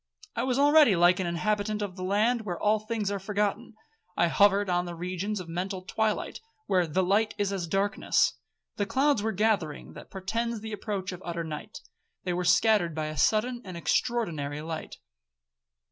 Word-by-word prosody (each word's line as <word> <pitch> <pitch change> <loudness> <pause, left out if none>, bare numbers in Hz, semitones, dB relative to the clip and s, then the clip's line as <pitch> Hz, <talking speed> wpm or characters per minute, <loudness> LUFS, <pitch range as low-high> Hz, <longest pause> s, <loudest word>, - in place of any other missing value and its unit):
I - - 0
was 255 -1 0
already 290 -5 +6
like 175 +2 +4
an 185 - -1
inhabitant 210 +5 -1
of 190 -3 -5
the 185 - -8
land 215 +5 +2
where 180 -6 -5
'all 215 +1 +2
things 215 -2 -2
are 200 - -2
forgotten.' 210 +3 -2 0.4
I 170 - +3
hovered 200 +3 +4
on 175 -1 +1
the 175 -1 -6
regions 185 +4 -3
of 180 - -7
mental 185 +3 -4
twilight, 215 +3 -1 0.3
where 180 -3 +2
the 185 +5 +1
'light 205 +4 +1
is 200 -1 0
as 180 -3 -3
darkness.' 195 +4 +1 0.4
The 205 - -1
clouds 265 +1 +2
were 220 +1 0
gathering 195 -7 -1
that - - -12
portended 225 +4 -3
the 220 -1 -5
approach 200 -2 -3
of 180 0 -8
utter 170 -1 -3
night,—they 180 - -8
were 180 +1 -1
scattered 175 -1 +3
by 155 -1 -2
a 155 - -6
sudden 240 +7 +1
and 185 -3 -8
extraordinary 155 - -1
light. 160 0 -6
200 Hz, 175 wpm, -28 LUFS, 175-215 Hz, 0.4 s, already